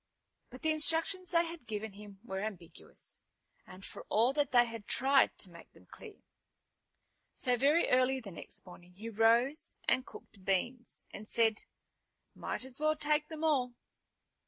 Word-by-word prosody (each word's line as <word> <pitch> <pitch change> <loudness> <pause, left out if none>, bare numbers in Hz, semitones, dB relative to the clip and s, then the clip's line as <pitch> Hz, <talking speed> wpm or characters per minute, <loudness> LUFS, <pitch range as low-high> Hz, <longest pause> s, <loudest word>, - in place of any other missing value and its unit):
But 255 +1 -12
the 315 - +3
instructions 330 +4 +2
they 340 -1 +3
had 330 -7 -9
given 215 -1 -4
him 200 -1 -12
were 190 -5 -4
ambiguous, 185 -6 -8 0.6
for - - -8
all 235 +5 +3
that 290 0 +1
they 240 -1 +6
had 230 -3 -8
tried 270 +1 +4
to 185 - -4
make 170 -1 -14
them - - -19
clear. 425 -3 -13 1.1
So 250 -2 +2
very 285 +7 +3
early 255 +1 +3
the 215 -6 -9
next 170 - -8
morning 180 0 -14
he 215 +5 -7
rose 235 +8 +2
and 260 - +3
cooked 200 -6 -14
beans, 240 +7 -2
and 215 - -9
said, 225 -2 +2 0.7
"Might - - -5
as 260 0 -10
well 310 0 +2
take 300 0 +1
them 315 -1 -7
all." 260 -6 +2
245 Hz, 160 wpm, -33 LUFS, 210-300 Hz, 1.1 s, they